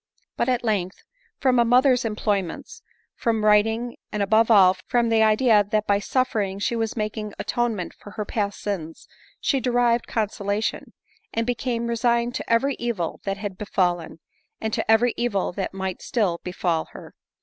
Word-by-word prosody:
But, 240 Hz, -, 0 dB
at 250 Hz, -1 st, 0 dB
length, 200 Hz, -5 st, -2 dB, 0.3 s
from 255 Hz, -3 st, +2 dB
a -, -, +6 dB
mother's 250 Hz, +1 st, +4 dB
employments, 205 Hz, -5 st, -2 dB, 0.3 s
from 225 Hz, -2 st, 0 dB
writing, 220 Hz, +3 st, +2 dB
and 210 Hz, -1 st, -1 dB
above 220 Hz, +3 st, +3 dB
all, 190 Hz, -4 st, +6 dB
from 240 Hz, -2 st, +2 dB
the 225 Hz, -1 st, +3 dB
idea 215 Hz, 0 st, +4 dB
that 210 Hz, +1 st, -1 dB
by 200 Hz, -1 st, +2 dB
suffering 210 Hz, -5 st, -1 dB
she 205 Hz, +4 st, -1 dB
was 225 Hz, 0 st, -2 dB
making 215 Hz, -1 st, -3 dB
atonement 230 Hz, -7 st, -2 dB
for -, -, -13 dB
her 210 Hz, -, -2 dB
past 205 Hz, -1 st, -2 dB
sins, 165 Hz, -6 st, -5 dB, 0.3 s
she 275 Hz, -, +1 dB
derived 245 Hz, -1 st, +1 dB
consolation, 205 Hz, -1 st, -2 dB, 0.4 s
and 230 Hz, 0 st, -1 dB
became 240 Hz, -1 st, -2 dB
resigned 235 Hz, +1 st, +1 dB
to -, -, -5 dB
every 270 Hz, +5 st, +3 dB
evil 225 Hz, -9 st, -3 dB
that 195 Hz, 0 st, -2 dB
had 200 Hz, -2 st, -6 dB
befallen, 175 Hz, -5 st, -1 dB, 0.4 s
and 220 Hz, -1 st, -3 dB
to -, -, -2 dB
every 230 Hz, +2 st, +4 dB
evil 220 Hz, -6 st, 0 dB
that 190 Hz, +2 st, -4 dB
might 190 Hz, -1 st, -4 dB
still 195 Hz, -8 st, 0 dB
befal 175 Hz, -3 st, -1 dB
her. -, -, -11 dB
220 Hz, 160 wpm, -24 LUFS, 200-235 Hz, 0.4 s, a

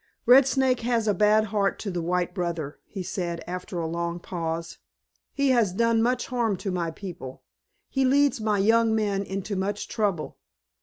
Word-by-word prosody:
"Red 260 Hz, +2 st, +7 dB
Snake 265 Hz, -1 st, +2 dB
has 230 Hz, -2 st, 0 dB
a 210 Hz, -, +3 dB
bad 210 Hz, +3 st, +4 dB
heart 200 Hz, -2 st, +1 dB
to 200 Hz, -, -3 dB
the 175 Hz, -1 st, -2 dB
white 180 Hz, +1 st, -1 dB
brother," 170 Hz, -6 st, -3 dB
he 195 Hz, -3 st, -6 dB
said 170 Hz, -2 st, -4 dB
after 180 Hz, 0 st, -6 dB
a 165 Hz, -, -1 dB
long 170 Hz, +1 st, -3 dB
pause. 165 Hz, -1 st, -4 dB, 0.5 s
"He 280 Hz, -1 st, +1 dB
has 230 Hz, -7 st, +2 dB
done 230 Hz, +2 st, +2 dB
much 245 Hz, +2 st, +1 dB
harm 235 Hz, -6 st, 0 dB
to 195 Hz, +1 st, -4 dB
my 175 Hz, -2 st, -1 dB
people. 165 Hz, -7 st, -8 dB, 0.4 s
He 270 Hz, -, 0 dB
leads 275 Hz, -1 st, +3 dB
my 215 Hz, -1 st, +1 dB
young 225 Hz, +2 st, +3 dB
men 205 Hz, -3 st, 0 dB
into 195 Hz, +1 st, -4 dB
much 200 Hz, +2 st, -2 dB
trouble. 205 Hz, -8 st, -2 dB
200 Hz, 175 wpm, -26 LUFS, 175-230 Hz, 0.5 s, Red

